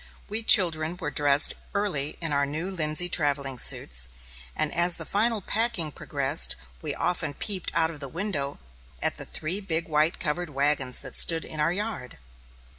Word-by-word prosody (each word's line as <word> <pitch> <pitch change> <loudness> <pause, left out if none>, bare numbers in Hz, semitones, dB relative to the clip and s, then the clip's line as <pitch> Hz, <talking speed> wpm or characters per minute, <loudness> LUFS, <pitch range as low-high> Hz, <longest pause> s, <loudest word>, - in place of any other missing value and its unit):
We 215 +2 -3
children 170 -6 +4
were 160 -5 -5
dressed 145 0 +4 0.2
early 175 -8 -2
in 165 -3 -3
our 140 0 +1
new 160 +6 -4
linsey 160 0 0
travelling 140 -6 0
suits; 65 - +2 0.5
and 155 -1 -1
as 175 +1 +3
the 165 - -6
final 220 +3 +1
packing 200 -7 0
progressed, 140 +1 +2 0.3
we - - -5
often 165 -5 -2
peeped 195 -4 0
out 165 -1 +3
of 155 - -7
the 140 -2 -6
window 160 -5 -4 0.4
at - - -1
the - - -3
three 175 +6 -3
big 170 -4 -3
white 155 +1 +1
covered 170 +3 -3
wagons 140 -2 +2
that - - -6
stood 165 -1 +2
in 155 - -5
our 150 +3 +2
yard. 200 - -5
160 Hz, 170 wpm, -26 LUFS, 145-180 Hz, 0.5 s, children